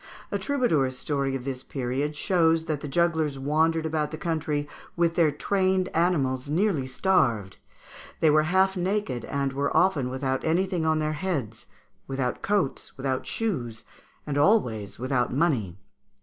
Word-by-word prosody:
A - - -1
troubadour's 160 - +1
story 140 -1 -1
of 130 -1 -5
this 130 -2 -4
period 135 +4 -3
shows 165 -1 +2
that 155 -3 -2
the 145 - -6
jugglers 160 -2 +1
wandered 160 +4 +1
about 155 -1 -1
the 155 - -6
country 155 -3 -2 0.3
with 170 -1 +2
their 165 -2 +4
trained 185 +4 +1
animals 140 -6 0
nearly 165 -4 +1
starved; 130 - +1 0.6
they 155 - +4
were 155 +1 +5
half 190 +1 +3
naked, 180 - -1
and 140 -1 -2
were 140 +1 0
often 155 -9 +2
without 130 0 -2
anything 175 0 +1
on 160 0 +3
their 155 0 0
heads, 145 - -3 0.4
without 135 -2 -2
coats, 200 -12 -1
without 130 -1 -2
shoes, 125 - -3 0.4
and 145 -1 -1
always 125 - +2
without 130 0 0
money. 125 - 0
150 Hz, 150 wpm, -26 LUFS, 130-170 Hz, 0.6 s, were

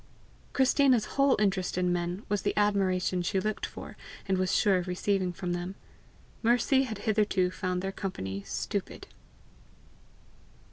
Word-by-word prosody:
Christina's 265 -3 +4
whole 275 -1 +3
interest 190 -3 0
in 180 -1 +2
men 175 +3 -2
was 205 -1 0
the - - -1
admiration 190 -3 +2
she 190 +2 0
looked 215 +2 -2
for - - -9 0.3
and 190 - +2
was 185 0 +1
sure 200 -3 +4
of 180 - -5
receiving 185 0 0
from 175 0 -4
them; 175 +2 -4 0.7
Mercy 245 +3 +3
had 220 -4 -5
hitherto 205 -4 +1
found 185 -1 -2
their 195 - -2
company 100 - -4
stupid. - - -4
190 Hz, 140 wpm, -29 LUFS, 180-215 Hz, 0.7 s, Christina's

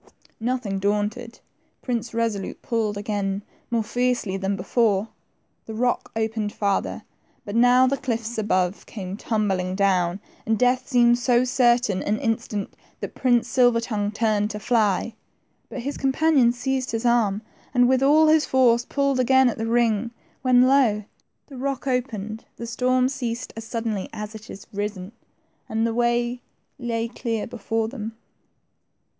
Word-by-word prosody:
Nothing 230 -4 -2
daunted. 210 +4 -2 0.4
Prince 240 -2 -2
Kesolute 225 -4 -3
pulled 220 -3 -1
again, 200 -1 -2 0.3
more 230 -2 +1
fiercely 245 -3 -1
than 195 +1 -1
before; 215 -1 +1 0.6
the 220 - -6
rock 245 +2 0
opened 220 -1 -1
farther, 200 -2 -1 0.4
but 205 - -5
now 245 +2 +6
the 275 +2 +1
cliffs 230 -3 -3
above 185 -3 0
came 190 -3 -6
tumbling 195 -4 -1
down, 190 -2 +1 0.2
and 225 0 +1
death 250 +1 +2
seemed 240 -2 +4
so 245 0 +3
certain 245 -6 +2
and 210 +1 0
instant 225 -5 -2 0.3
that - - -6
Prince 245 -3 +2
Silver 245 -3 +4
tongue 210 -3 -2
turned 215 -1 +1
to 210 -1 -5
fly. 220 -1 +1 0.6
But 260 - -5
his 280 +4 -4
companion 270 -2 +3
seized 260 +1 -2
his 225 +2 -2
arm, 225 -3 +2 0.3
and 245 -1 +4
with 260 0 +3
all 300 +3 +5
his 310 -1 +4
force 245 -2 +4
pulled 275 -2 0
again 260 0 +5
at 230 - -5
the 225 - -2
ring, 230 -1 +2 0.3
when 250 -1 +5
lo, 255 -6 +3 0.4
the 275 - -11
rock 275 +1 -3
opened, 225 -5 -3
the 235 - -7
storm 250 +2 +1
ceased 245 -3 -4
as 225 0 -7
suddenly 225 -4 -3
as 210 +1 -6
it 220 0 -10
had 195 - -10
risen, 205 -1 -4 0.6
and 225 +1 0
the 230 - 0
way 240 +1 0 0.4
lay 230 -2 -2
clear 230 -2 -3
before 225 -1 -2
them. 225 -2 -7
230 Hz, 150 wpm, -24 LUFS, 210-250 Hz, 0.6 s, now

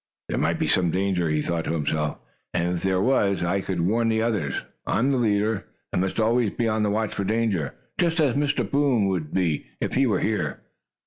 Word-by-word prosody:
"There - - -1
might - - +1
be - - 0
some 90 -2 +2
danger," 90 -2 0
he 75 -1 +1
thought 85 -2 -1
to - - -1
himself, 75 -1 -1 0.4
"and 90 0 +1
if - - -6
there 95 0 +1
was, 100 -8 +2
I 95 +3 +1
could 95 -3 -2
warn 115 +6 +2
the 110 0 +2
others. 105 - -1 0.2
I - - +1
am 130 +6 +2
the 130 - +1
leader, 105 -2 +1 0.3
and 90 - +1
must 95 +3 -1
always 115 0 +3
be 115 +3 -1
on 110 0 +1
the 105 - +2
watch 110 +1 -1
for 100 - -2
danger, 105 - 0 0.2
just 170 -1 +2
as 145 -6 +3
Mr. 145 -5 0
Boom 140 -5 +2
would 80 -5 -2
be, 85 -5 0
if - - -2
he 135 0 +3
were 110 - +1
here." 90 -11 -1
100 Hz, 220 wpm, -25 LUFS, 90-115 Hz, 0.4 s, always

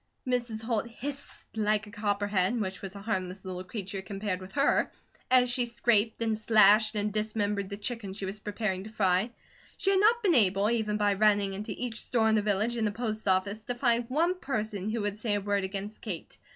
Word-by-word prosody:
Mrs. 240 -3 -2
Holt 230 0 -1
hissed 280 +4 -7
like 215 0 +1
a 210 - -12
copperhead, 205 0 0
which 190 -3 -3
was 195 0 -7
a 200 - -8
harmless 190 -3 -3
little 185 -1 -5
creature 195 0 -5
compared 195 -1 -4
with 185 +1 -10
her, 280 0 +3 0.4
as 255 -1 +5
she 245 0 +1
scraped, 230 -1 +1
and 225 -1 +1
slashed, 215 0 +5
and 210 0 -1
dismembered 210 -2 -1
the 200 - -5
chicken 215 -2 -3
she 195 0 -5
was 195 +2 -4
preparing 210 -3 -2
to 215 - -8
fry. 195 0 +1 0.5
She 390 - +2
had 385 - +4
not 455 +3 +4
been 375 -4 +4
able, 205 -3 +3
even 215 -3 0
by 205 -1 +2
running 205 -1 +3
into 205 +2 -5
each 235 -3 -2
store 230 -3 +1
in - - +3
the 215 - +3
village, 210 +3 0
and 220 -2 +1
the - - -1
post 220 -1 -3
office, 200 +3 +1
to 245 - -3
find 240 -1 +2
one 340 +7 +1
person 215 - -3
who 225 0 -1
would 205 0 -2
say 215 -2 0
a - - +1
word 200 0 0
against 200 +2 -5
Kate. 190 -7 -6
210 Hz, 210 wpm, -29 LUFS, 200-230 Hz, 0.5 s, as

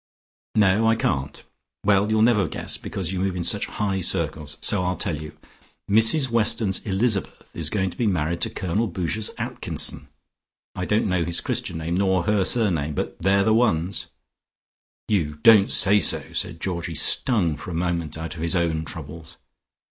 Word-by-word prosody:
"No, 105 +1 +3
I 115 - +3
can't. 70 -9 -3 0.4
Well, 100 0 +3
you'll 110 0 +2
never 115 -4 +3
guess - - -1
because 95 -1 -5
you 95 - -3
move 95 0 -1
in 90 - -3
such 100 +4 +1
high 100 -2 -2
circles, 75 -3 -1
so 95 +2 +3
I'll 90 0 -1
tell 80 -3 -3
you. 75 0 -10 0.5
Mrs 110 +7 +5
Weston's 110 -3 +2
Elizabeth 100 0 -2
is 80 -3 -1
going 95 -1 -1
to - - -15
be 120 - 0
married 85 -3 -1
to - - +1
Colonel 100 +6 -2
Boucher's 95 +4 -3
Atkinson. - - -3 0.7
I 90 - -4
don't 105 +3 0
know 90 -3 0
his 85 0 0
Christian - - -3
name, 85 +2 -3
nor 95 -2 +1
her 105 -1 +1
surname, 90 -9 +2
but - - -4
they're 100 +1 +2
the 110 - +2
ones!" 100 -6 0 1.0
"You 80 -8 -1
don't 110 -4 +6
say 100 +2 +4
so!" - - +2
said 85 - -2
Georgie, 85 -2 -4
stung 90 - +3
for - - -10
a 85 - -5
moment 85 -2 -2
out 80 -1 -6
of 80 - -9
his 85 +3 -1
own 80 -2 -1
troubles. 80 +1 -9
95 Hz, 175 wpm, -23 LUFS, 85-105 Hz, 1.0 s, don't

